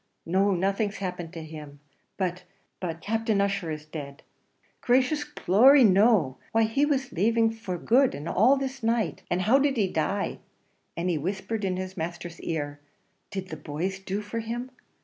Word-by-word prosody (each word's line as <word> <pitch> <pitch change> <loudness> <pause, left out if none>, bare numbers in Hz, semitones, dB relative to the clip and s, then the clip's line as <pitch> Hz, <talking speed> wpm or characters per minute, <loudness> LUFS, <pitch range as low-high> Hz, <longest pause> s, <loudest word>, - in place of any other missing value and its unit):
"No, 190 +4 +2
nothing's 200 +3 0
happened 180 -3 -5
him; 155 -3 -9 0.4
but 180 -2 -2 0.4
but 165 -2 -4
Captain 225 -1 0
Ussher 200 -3 0
is 155 -1 -5
dead!" 145 -2 -8 0.6
"Gracious 260 +4 +2
glory 270 0 +5
no! 195 - +4
why 225 0 +4
he 250 +7 +2
was 270 -2 0
laving 225 +5 +3
this 225 0 -9
for 185 -5 -4
good 255 +8 +3
and 145 +3 -7
all 240 +11 +4
this 270 0 -4
night. 225 -4 0
And 180 +1 0
how 245 +8 +5
did 275 -2 +1
he 205 -4 +2
die?" 190 +4 -1 0.6
and 170 +2 -1
he 170 -4 +1
whispered 195 +6 -3
in 185 -1 0
his 185 +1 -5
master's 170 +1 -5
ear 145 -3 -3 0.5
"did 190 -2 -5
the 155 - -6
boys 165 +6 -4
do 195 +1 -3
for 220 +3 -4
him?" 240 +3 -5
195 Hz, 170 wpm, -27 LUFS, 170-230 Hz, 0.6 s, glory